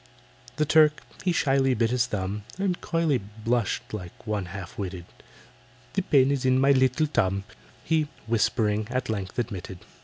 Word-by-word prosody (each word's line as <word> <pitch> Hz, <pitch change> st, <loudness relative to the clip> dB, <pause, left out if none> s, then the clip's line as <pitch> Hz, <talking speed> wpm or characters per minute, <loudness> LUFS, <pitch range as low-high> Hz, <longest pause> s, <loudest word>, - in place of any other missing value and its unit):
The 150 Hz, -, +1 dB
Turk 150 Hz, 0 st, +4 dB, 0.2 s
he 185 Hz, -, +2 dB
shyly 135 Hz, -5 st, +2 dB
bit 115 Hz, +1 st, +1 dB
his 125 Hz, -1 st, +2 dB
thumb, 100 Hz, +1 st, -3 dB, 0.2 s
And 190 Hz, -2 st, -1 dB
coyly 165 Hz, -6 st, +1 dB
blushed 110 Hz, +4 st, -2 dB
like 90 Hz, 0 st, -8 dB
one 105 Hz, -3 st, -2 dB
half 90 Hz, 0 st, -8 dB
witted, 95 Hz, -3 st, -5 dB, 0.9 s
"The 195 Hz, -, +1 dB
pain 140 Hz, -6 st, +4 dB
is 140 Hz, -2 st, 0 dB
in 130 Hz, 0 st, +3 dB
my 135 Hz, +1 st, +5 dB
little 130 Hz, +3 st, +3 dB
tum," 100 Hz, -9 st, 0 dB, 0.4 s
He, 160 Hz, -2 st, +1 dB, 0.2 s
whispering, 110 Hz, -1 st, +1 dB
at 130 Hz, -1 st, -2 dB
length 95 Hz, -4 st, -4 dB
admitted. 100 Hz, -6 st, -4 dB
120 Hz, 155 wpm, -26 LUFS, 105-140 Hz, 0.9 s, my